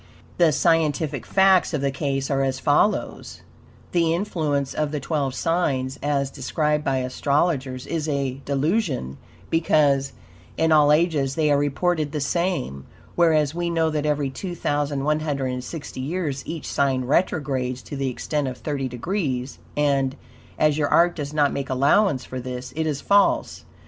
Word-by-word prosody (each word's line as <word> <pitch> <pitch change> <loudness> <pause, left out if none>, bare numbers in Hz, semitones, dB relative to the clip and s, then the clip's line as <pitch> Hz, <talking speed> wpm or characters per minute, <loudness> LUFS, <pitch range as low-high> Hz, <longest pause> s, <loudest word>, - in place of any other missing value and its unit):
The 170 -3 +5
scientific 155 -3 +1
facts 190 -3 +4
of 145 - -2
the 140 0 0
case 135 -1 -2
are 135 -1 +1
as 135 -1 -1
follows: 145 +9 0 0.5
The 165 -2 +2
influence 155 -8 -1
of 150 -1 -1
the 150 - -2
twelve 140 -2 -2
signs, 135 -6 -1
as 140 -2 0
described 150 +2 -1
by 135 -2 0
astrologers, 130 0 0
is 160 -2 -2
a 135 -2 -2
delusion, 140 - -1 0.3
because 145 -4 +2 0.4
in 160 0 +2
all 150 -1 +6
ages 150 -4 +2
they 155 -2 +2
are 145 - +4
reported 150 +1 0
the 150 - -1
same; 145 - -2 0.3
whereas 155 -4 +3
WE 175 0 -2
KNOW 165 -1 +1
that 150 -1 -1
every 145 -2 0
2,160 145 -4 -2
years 145 -2 -3
each 160 -1 -5
sign 135 -2 0
retrogrades 130 -4 0
to 145 - -7
the 135 -1 -1
extent 145 +3 -2
of 130 -1 -5
thirty 140 0 -3
degrees, 130 - -3 0.2
and, 140 -2 +1 0.4
as 155 0 +2
your 145 - +2
art 175 +1 +4
does 145 -3 -4
not 145 -2 +2
make 140 - -4
allowance 140 +3 +2
for 130 - -6
this, 125 0 -6
it 160 0 -1
is 145 -3 -2
false. 200 0 +2
145 Hz, 150 wpm, -23 LUFS, 135-160 Hz, 0.5 s, all